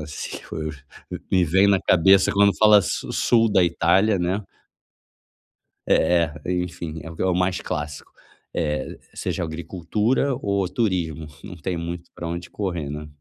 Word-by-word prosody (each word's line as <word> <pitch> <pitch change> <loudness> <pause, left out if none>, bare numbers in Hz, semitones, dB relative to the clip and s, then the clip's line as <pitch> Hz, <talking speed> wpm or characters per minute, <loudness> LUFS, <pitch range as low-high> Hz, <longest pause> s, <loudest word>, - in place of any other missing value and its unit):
na 75 - -6
Sicília, 75 - -7 0.9
me 90 -2 +4
vem 95 +5 +4
na 100 -2 +3
cabeça 95 +2 +4
quando 100 0 +4
fala 105 -1 +7
sul 115 +4 +1
da 95 -3 +5
Itália, 95 +5 +2
né? 90 +4 0 1.5
É 85 -1 +3
é, 90 - -1
enfim, 85 -3 -4
é 80 - -8
o 90 +3 0
mais 90 0 0
clássico, 75 -1 -5 0.4
eh, 75 -5 -2 0.2
seja - - -3
agricultura 95 - -1
ou 100 -2 0
turismo, 85 - -1 0.2
não 90 - -8
tem 85 +2 -3
muito 85 +1 -6
para 85 - -6
onde 85 +1 -5
correr, 85 -8 -3
né? 75 +1 -6
90 Hz, 140 wpm, -23 LUFS, 80-100 Hz, 1.5 s, fala